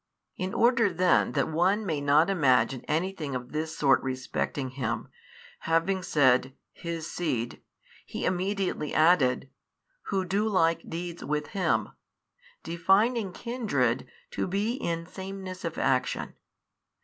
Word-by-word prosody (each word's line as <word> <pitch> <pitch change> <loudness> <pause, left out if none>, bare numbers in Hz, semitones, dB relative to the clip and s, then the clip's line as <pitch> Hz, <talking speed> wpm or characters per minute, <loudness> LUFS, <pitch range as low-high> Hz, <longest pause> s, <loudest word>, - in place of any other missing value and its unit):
In 185 +1 -3
order 235 -3 +4
then 180 +1 +3
that 140 -3 +1
one 190 +7 +1
may 155 -6 -1
not 145 +3 +4
imagine 130 -9 +2
anything 160 -3 -1
of 125 0 -5
this 160 +1 -3
sort 135 -3 +4
respecting 130 +1 -3
him, 120 -4 -3 0.5
having 165 +4 +1
said, 130 -5 +3 0.2
his 165 -2 -5
seed, 125 -10 -3 0.4
He - - -5
immediately 185 -4 -1
added, 140 -6 +3 0.6
Who 190 -2 0
do 200 +4 0
like 165 -5 +1
deeds 170 +1 -5
with 150 0 -2
him, 195 -3 0 0.7
defining 195 +6 +2
kindred 180 - -1 0.2
to - - -2
be 200 +5 0
in 170 -9 -3
sameness 190 0 -7
of 165 -2 -4
action. 130 -1 0
165 Hz, 125 wpm, -28 LUFS, 140-190 Hz, 0.7 s, order